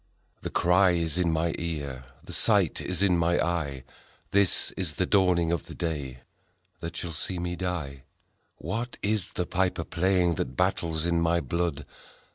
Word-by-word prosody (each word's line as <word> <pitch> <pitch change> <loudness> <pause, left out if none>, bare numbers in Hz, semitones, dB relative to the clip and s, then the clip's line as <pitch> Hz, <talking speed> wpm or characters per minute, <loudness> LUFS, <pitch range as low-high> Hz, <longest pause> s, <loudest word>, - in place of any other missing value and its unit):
The - - -4
cry 90 +1 +4
is 85 0 0
in 85 -2 +2
my 80 +1 0
ear, 70 -6 -4 0.2
The - - -7
sight - - +3
is 90 +1 0
in 90 -3 +3
my 85 +1 +2
eye, 75 -6 -1 0.5
This 100 -2 +4
is 85 -5 -3
the 95 - +1
dawning 90 -4 +3
of 85 -3 -1
the - - -8
day 70 -7 -4 0.6
That 85 0 -6
shall 85 - -3
see 90 +4 -2
me 90 0 -3
die: 85 -7 -4 0.5
What 115 +9 -4
is 105 -3 +1
the 90 - -1
piper 90 -2 0
playing 90 0 +1
That 65 0 -5
battles 80 -1 0
in 85 -1 +1
my 85 +1 +2
blood 80 0 -2
85 Hz, 165 wpm, -27 LUFS, 80-90 Hz, 0.6 s, cry